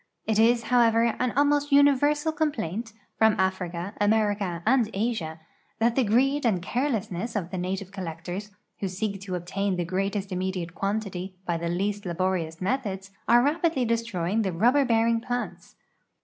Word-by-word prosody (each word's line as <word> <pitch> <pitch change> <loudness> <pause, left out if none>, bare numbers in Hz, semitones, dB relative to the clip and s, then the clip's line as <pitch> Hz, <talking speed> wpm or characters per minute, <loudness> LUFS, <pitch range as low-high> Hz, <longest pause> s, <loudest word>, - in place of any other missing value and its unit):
Jt 220 -1 +2
is, 230 +1 +4
however, 230 -1 +3
an 250 -1 +1
almost 290 +1 +2
universal 290 +2 +4
com|)laiut, 235 - -2 0.3
from 220 -1 +4
Africa, 190 0 -1
America, 205 -5 +1
and 240 -2 +3
Asia, 195 -7 -2 0.4
that 230 +1 +2
the 265 - +3
greed 265 +7 +2
and 215 -7 +2
carelessness 225 -1 -2
of 180 -4 -2
the 185 - -3
native 185 +1 -3
collectors, 180 +1 -6 0.3
who 195 - -1
seek 195 +1 -3
to 190 -2 -4
obtain 190 +2 -2
the 175 -1 -2
greatest 195 +2 -2
immediate 185 -2 -3
quantity 195 -2 -3
b\' 170 -1 0
the 170 0 -3
least 200 +3 -2
laborious 175 -2 -1
methods, 195 -3 -2 0.2
are 240 +1 +6
rapidly 310 -2 +1
destroying 225 -4 0
the 195 -3 -1
rubber 245 +11 +3
bearing 230 -1 +2
plants. 245 +1 -5
205 Hz, 150 wpm, -26 LUFS, 185-240 Hz, 0.4 s, are